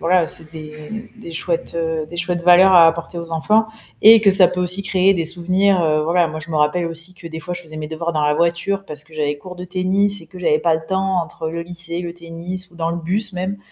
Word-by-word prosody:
voilà, 175 0 +2
c'est 160 0 -7
des 155 -1 -9 0.4
des 220 -7 -11
chouettes, 165 +1 -3
heu, 160 -2 -2
des 170 - -8
chouettes 175 0 -2
valeurs 180 +2 +6
à 170 -2 +8
apporter 170 +1 -4
aux 170 0 -9
enfants 210 +7 +2 0.4
et 225 +1 +9
que 200 -2 +4
ça 190 -2 +6
peut 180 +1 -5
aussi 180 +2 +1
créer 195 0 +3
des 170 - -1
souvenirs, 185 +3 +1
heu, 155 -2 +2
voilà. 170 +2 +2
Moi, 155 0 -6
je 170 - -12
me 160 - -1
rappelle 150 +4 +1
aussi 165 +2 -3
que 175 -2 -10
des 160 0 -7
fois, 175 +2 -5
je 175 - -7
faisais 155 -2 -11
mes 155 0 -5
devoirs 165 +2 -4
dans 155 -2 -1
la 150 0 +2
voiture 170 +5 0
parce 150 -4 -6
que 160 +1 -17
j'avais 150 -1 -1
cours 180 +4 -10
de 180 0 -8
tennis 190 +2 +1
et 165 - -13
que 185 - -12
j'avais 155 -3 +2
pas 165 +1 +2
le 160 0 -3
temps 190 0 0
entre 160 -1 -6
le 170 +1 -4
lycée, 170 0 -4
le 170 -1 -5
tennis 175 +2 -7
ou - - -20
dans 165 -1 -2
le 170 - -3
bus 195 +5 -2
même 185 +2 -4
170 Hz, 260 wpm, -19 LUFS, 160-185 Hz, 0.4 s, et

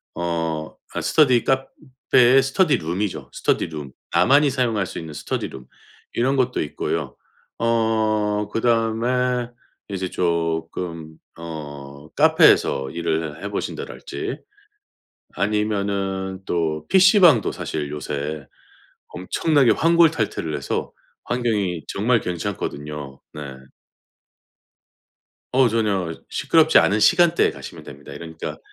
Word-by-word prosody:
어 80 -2 -3 0.2
아 - - -2
스터디 130 -7 +3
카페의 130 -1 +2
스터디 150 +4 +2
룸이죠, 90 +5 -3
스터디 - - 0
룸. 75 -5 -7 0.2
나만이 140 +3 +5
사용할 115 -7 0
수 - - -7
있는 80 -2 -8
스터디 - - -3
룸 65 - -11 0.5
이런 130 +3 +1
것도 125 -1 +1
있고요. 75 - -3 0.4
어 110 -2 +1
그다음에 120 +2 +1 0.4
이제 95 -2 -3
쪼끔 85 -1 -2 0.2
어 75 -3 -9
카페에서 65 -1 +4
일을 80 -1 -3
해 - - -3
보신다랄지 125 - -5 1.0
아니면은 100 -2 -1
또 80 -3 -1
피시방도 185 - +5
사실 75 -2 -4
요새 75 0 -5 0.6
엄청나게 135 - +1
환골탈퇴를 165 -1 +2
해서 - - -3 0.3
환경이 105 -9 -1
정말 115 +3 +1
괜찮거든요. 75 -7 -5
네. 70 -3 -8 2.0
어우 130 -1 +5
전혀 100 -7 0 0.2
시끄럽지 160 -1 +3
않은 105 +2 +2
시간대에 175 +10 +4
가시면 - - -10
됩니다. 70 +1 -11
그러니까 80 -1 -7
100 Hz, 250 characters per minute, -22 LUFS, 80-125 Hz, 2.0 s, 나만이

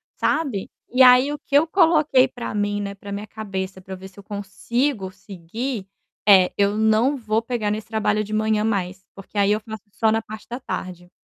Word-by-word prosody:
sabe. 270 -12 -1 0.2
E 255 +1 +5
aí 255 +3 +7
o 295 - -3
que 280 - -4
eu 310 +3 +5
coloquei 310 -7 +4
para 245 -3 -6
mim, 205 0 0
né, 200 0 -5
para 200 +1 -10
minha 205 +1 -5
cabeça, 190 -3 -5
para 190 +1 -8
ver 190 +1 -10
se 190 - -21
eu - - -12
consigo 205 +2 -2
seguir, 195 +4 -6 0.4
é: 190 -3 +7
Eu 200 +1 +2
não 220 +6 +3
vou 220 -2 0
pegar 230 -3 -2
nesse 215 +1 -3
trabalho 215 -1 0
de 215 +1 -7
manhã 215 0 +1
mais, 190 -3 -2
porque 195 +1 -11
aí 200 0 +3
eu 210 - +2
faço 220 -2 -9
só 220 +1 +1
na 225 0 +1
parte 215 0 -10
da 245 +2 -5
tarde. 180 -7 -6
215 Hz, 205 wpm, -22 LUFS, 195-240 Hz, 0.4 s, aí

